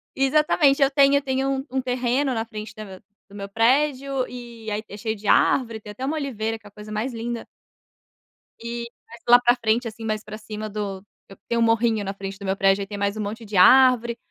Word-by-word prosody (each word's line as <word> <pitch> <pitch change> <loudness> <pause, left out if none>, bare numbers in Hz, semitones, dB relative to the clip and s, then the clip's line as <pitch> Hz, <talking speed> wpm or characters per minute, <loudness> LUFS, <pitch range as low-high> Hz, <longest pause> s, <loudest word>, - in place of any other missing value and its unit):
Exatamente. 280 +1 +3
Eu 275 - +5
tenho 280 0 +4
eu 280 - +3
tenho 270 0 -1
um 265 0 -1
terreno 255 +2 0
na 225 -1 -2
frente 215 -1 -8
da 195 -3 -10 0.3
do - - -19
meu 200 0 -7
prédio 270 +4 +1
e 235 -3 -9
aí 210 +1 -3
é 205 - -9
cheio 220 +1 -3
de 205 0 -9
árvore. 230 -2 +2
Tem 210 - -9
até 255 +6 -6
uma 300 +4 -1
oliveira 225 -6 -3
que 205 - -16
é - - -13
a - - -29
coisa 210 +1 -11
mais 215 +5 -2
linda. 235 0 -5 1.1
E 235 0 -5 0.2
mais 235 - -13
lá 245 +1 +8
pra 245 0 +3
frente, 230 0 0
assim, 225 0 -8
mais 215 -1 -2
pra 215 0 -8
cima 215 0 -7
do 200 -2 -5 0.3
e 195 - -12
tem 235 - -1
um - - +2
morrinho 225 -1 +2
na 195 0 -4
frente 195 0 -7
do 200 - -9
meu 190 +1 -1
prédio. 195 0 +3
Aí 195 - -5
tem 205 - -6
mais 200 +1 -1
um 215 - -4
monte 220 +3 -5
de 205 - -7
árvore 240 +2 +6
230 Hz, 230 wpm, -23 LUFS, 210-255 Hz, 1.1 s, lá